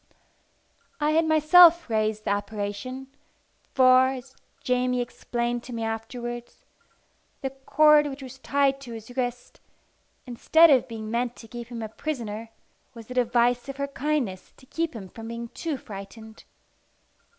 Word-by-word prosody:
I 300 0 +2
had 320 +1 +2
myself 335 +2 +6
raised 215 -1 -1
the - - 0
apparition, 205 +5 -4 0.7
for, 255 0 +6
as 265 0 -6 0.3
Jamie 250 0 +1
explained 240 0 -3
to 250 - -8
me 230 -1 -3
afterwards, 240 +2 -6 0.8
the 270 - -3
cord 295 +2 +4
which 275 -1 -7
was 265 0 -10
tied 275 0 +1
to 240 -4 -9
his 225 +2 -10
wrist, 245 -1 -4 0.7
instead 315 +6 +5
of 260 -3 +4
being 220 -2 -7
meant 240 +1 -1
to 225 - -13
keep 235 +1 -8
him 235 -2 -6
a - - -3
prisoner, 225 -3 -5 0.5
was 230 +1 -11
a - - -3
device 245 +1 +1
of 275 - -6
her 280 0 -2
kindness 275 -10 -2
to 260 - -18
keep 325 +1 -3
him 200 -4 -7
from 225 +4 -10
being 235 0 -6
too 315 +1 -4
frightened. 220 0 -11
245 Hz, 150 wpm, -26 LUFS, 225-275 Hz, 0.8 s, myself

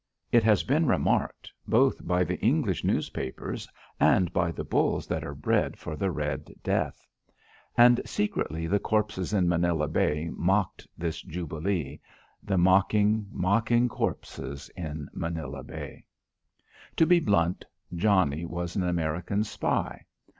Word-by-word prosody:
It 120 -1 +5
has 105 -2 +4
been 155 +4 +2
remarked - - 0 0.2
both - - +2
by 90 +1 +3
the 85 - -3
English - - +1
newspapers 65 - -3 0.3
and 90 -3 +3
by 85 -1 +1
the - - -5
bulls - - +1
that - - -3
are - - -6
bred - - 0
for 75 - -6
the 95 +5 -1
red 75 -4 -3
death. - - -1 0.7
And 120 0 +7
secretly 80 -5 -2
the 100 +5 +1
corpses 105 -4 -1
in 95 -4 +2
Manila 85 -3 +1
Bay 75 +1 0
mocked 95 +2 0
this 85 -1 -3
jubilee; 80 -3 -3 0.4
the 95 -2 -1
mocking, 100 +4 +3
mocking 115 +6 +2
corpses 70 - -4
in 75 -3 -5
Manila 80 -5 -4
Bay. - - -8 0.9
To 165 - +5
be 175 +1 +5
blunt, 90 - +1 0.3
Johnnie 85 -4 +2
was 85 0 -4
an 95 - +1
American 90 +3 -1
spy. 110 - -2
90 Hz, 130 wpm, -28 LUFS, 80-105 Hz, 0.9 s, And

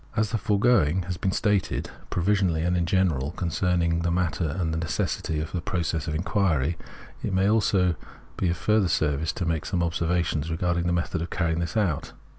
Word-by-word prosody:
As 110 -3 +1
the 115 - 0
foregoing 100 -4 +3
has 90 +1 -4
been 95 - 0
stated, 105 -1 0 0.2
provisionally 90 -3 +1
and 90 +1 +1
in 85 -1 0
general, 85 -8 +1
concerning 85 -1 0
the 85 0 0
manner 85 -2 0
and 80 -3 -1
the 80 - -1
necessity 80 -1 -2
of 80 0 -4
the 90 - -2
process 85 -2 -2
of 80 - -2
the - - 0
inquiry, 85 -4 +1 0.5
it - - -2
may 95 +1 +2
also 100 -4 +3 0.4
be 90 - 0
of 85 - -1
further 105 +1 +2
service 80 -1 +1
to 90 - -3
make 80 -2 0
some 90 -3 -1
observations 85 -2 0
regarding 85 +1 0
the - - +1
method 85 -1 -1
of 85 - -4
carrying 85 -2 0
this 85 +6 -2
out. 90 -9 0
85 Hz, 195 wpm, -26 LUFS, 80-95 Hz, 0.5 s, foregoing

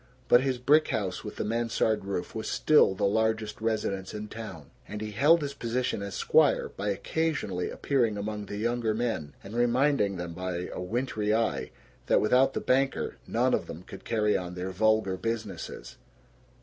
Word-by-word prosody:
But 120 - +6
his 130 -1 0
brick 150 +5 +4
house 95 -4 -2
with 105 - -7
the - - -2
mansard 115 -2 0
roof 100 -3 -3
was 110 - -4
still 150 -10 +4
the - - 0
largest 110 +1 0
residence 105 -3 -2
in 105 0 -6
town, 105 -10 -8 0.2
and 105 - -6
he 105 0 -5
held 150 +9 +4
his 140 -1 -3
position 120 -4 -2
as 100 -1 -5
squire - - +3
by 105 +2 -4
occasionally 100 - -1
appearing 120 -7 0
among 105 0 -4
the 100 - -5
younger 115 0 0
men 110 -12 -2
and 100 +3 -9
reminding 120 -4 +2
them 85 -1 -5
by 90 0 -4
a - - -5
wintry 110 +1 -1
eye 115 0 0 0.4
that - - +4
without 130 +5 +3
the - - -1
banker 135 +1 +1
none - - +1
of - - 0
them 85 - -8
could 95 0 -11
carry 105 -2 +1
on 90 -1 -3
their 90 +1 -4
vulgar 110 -1 +2
businesses. 105 - -5
110 Hz, 175 wpm, -28 LUFS, 100-120 Hz, 0.4 s, But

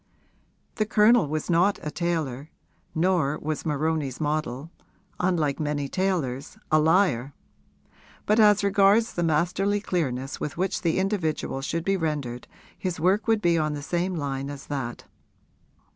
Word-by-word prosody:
The 215 -2 0
Colonel 220 -2 +5
was 155 +1 -3
not 180 +4 +3
a 150 - -3
tailor, 155 -5 -2 0.5
nor 160 -4 +1
was 155 +1 -4
Moroni's 150 -3 -1
model, 150 -1 -2 0.5
unlike 165 -6 +1
many 145 -2 -1
tailors, 150 -7 -2
a 155 - +5
liar; 155 -6 +2 0.9
but 210 +2 +3
as 210 -2 +5
regards 200 +3 +4
the 175 - -2
masterly 180 +5 +1
clearness 135 -9 -2
with 145 - -4
which 185 +1 -1
the 165 -2 +1
individual 180 -8 -1
should 165 +5 -3
be 195 0 +2
rendered 145 -7 -3 0.3
his 180 -3 -4
work 190 +7 +2
would 220 -2 +2
be 170 -1 +3
on 155 -1 0
the 145 -1 -5
same 175 +4 -1
line 140 -3 -3
as 140 -1 -8
that. 130 -5 -4
160 Hz, 145 wpm, -25 LUFS, 145-190 Hz, 0.9 s, Colonel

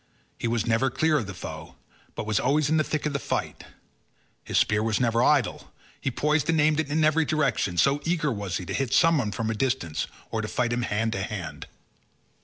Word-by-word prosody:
He - - -1
was 115 -1 0
never 115 +3 +2
clear 155 -1 +2
of 110 - -5
the 100 - -6
foe, - - -8 0.4
but - - -4
was 110 -1 +1
always 145 +2 +1
in 160 - +4
the 155 - +3
thick 155 0 -3
of 150 - -1
the 140 - -1
fight; - - -3 0.8
his - - -2
spear 105 0 +3
was 110 -1 0
never 115 -1 +2
idle; 140 0 +1 0.3
he - - -1
poised 150 +4 0
and 160 -1 +3
aimed 150 0 +3
it 155 - -1
in 155 +2 +1
every 155 +1 +4
direction, 140 - 0
so 140 +8 +3
eager 160 -3 0
was 100 -6 -3
he 90 - -6
to - - -5
hit 135 -2 -1
someone 150 -10 +3
from 110 +1 -2
a - - 0
distance 105 - -1 0.2
or 110 - -1
to 105 - -4
fight 120 +1 -1
him 120 - 0
hand 110 0 -1
to 95 - -2
hand. 100 -2 -5
125 Hz, 220 wpm, -26 LUFS, 110-150 Hz, 0.8 s, in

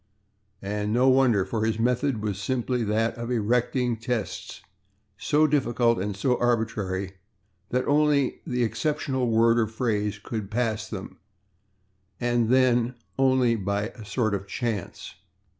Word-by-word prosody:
And 105 +1 -2
no 125 +4 +4
wonder, 130 -7 +4
for 110 +3 -2
his 110 -1 0
method 125 0 0
was 100 -2 -2
simply 125 0 -1
that 110 +2 +1
of 120 0 -4
erecting 120 +1 0
tests 115 -1 -4 0.5
so 150 +8 +2
difficult 120 -6 +2
and 100 +1 -3
so 125 +4 +1
arbitrary 100 -5 -1 0.5
that 125 +1 0
only 145 -2 +2
the 125 -1 0
exceptional 130 0 -1
word 115 +1 +4
or 110 - +2
phrase 105 -2 -1
could 105 -1 -5
pass 110 -1 -1
them, 100 -4 -7 1.0
and 120 -1 +1
then 125 -1 +3 0.2
only 130 -3 +3
by 100 +1 -2
a 115 - -12
sort 110 +1 -1
of 100 0 -3
chance. 110 -2 -4
115 Hz, 135 wpm, -26 LUFS, 105-125 Hz, 1.0 s, no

